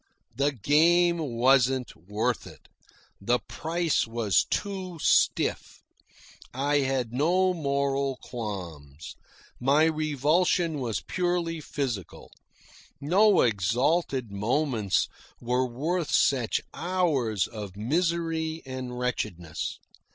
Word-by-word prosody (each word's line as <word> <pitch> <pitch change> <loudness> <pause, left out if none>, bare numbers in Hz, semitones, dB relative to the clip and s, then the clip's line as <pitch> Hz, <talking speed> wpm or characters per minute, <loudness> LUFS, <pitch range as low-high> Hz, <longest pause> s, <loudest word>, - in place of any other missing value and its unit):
The 140 +3 +2
game 170 - +3
wasn't 130 -2 +2
worth 105 +7 -2
it. - - -15 0.5
The 120 +5 +2
price 165 0 -1
was 115 -5 +1
too 190 -4 -3
stiff. - - +1 0.7
I 145 +2 +1
had 130 -4 -1
no 180 +7 +2
moral 140 -3 -1
qualms. 85 - -7 0.4
My 140 +5 +3
revulsion 155 +2 +1
was 115 -9 -2
purely 175 - -1
physical. 125 - -5 0.7
No 195 +7 +4
exalted 120 - +1
moments 110 0 0 0.3
were 125 +2 0
worth 155 +7 -2
such 125 -5 +2
hours 155 - 0
of 105 -3 -8
misery 165 - -1
and 130 -2 -6
wretchedness. 90 -10 -3
135 Hz, 90 wpm, -27 LUFS, 115-165 Hz, 0.7 s, No